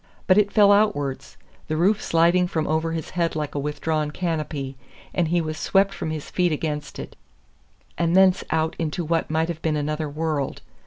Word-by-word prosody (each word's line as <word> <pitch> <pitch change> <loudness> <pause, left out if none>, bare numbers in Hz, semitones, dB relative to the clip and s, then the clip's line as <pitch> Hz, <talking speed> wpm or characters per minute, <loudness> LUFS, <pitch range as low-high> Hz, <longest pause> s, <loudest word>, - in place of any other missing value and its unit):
But 185 +2 +5
it 205 -1 +2
fell 205 -1 +6
outwards, 200 -11 +1 0.3
the 155 - -1
roof 195 +6 +3
sliding 170 +2 +3
from 160 -3 -1
over 160 +1 0
his 165 -1 -5
head 170 -2 -1
like 150 -2 -3
a 145 - -2
withdrawn 150 +1 -1
canopy; 150 -5 -3 0.4
and 175 -2 +1
he 170 +2 +1
was 155 -1 -4
swept 195 0 +2
from - - -4
his 155 -2 -5
feet 180 -2 +1
against 150 -1 -3
it, - - -8 0.8
and 170 0 +2
thence 190 0 +5
out 160 0 0
into 165 +1 -2
what 165 +1 0
might 160 +1 +1
have 165 -2 -5
been 160 -1 0
another 150 +1 -2
world! 150 -2 -2
160 Hz, 190 wpm, -23 LUFS, 155-175 Hz, 0.8 s, fell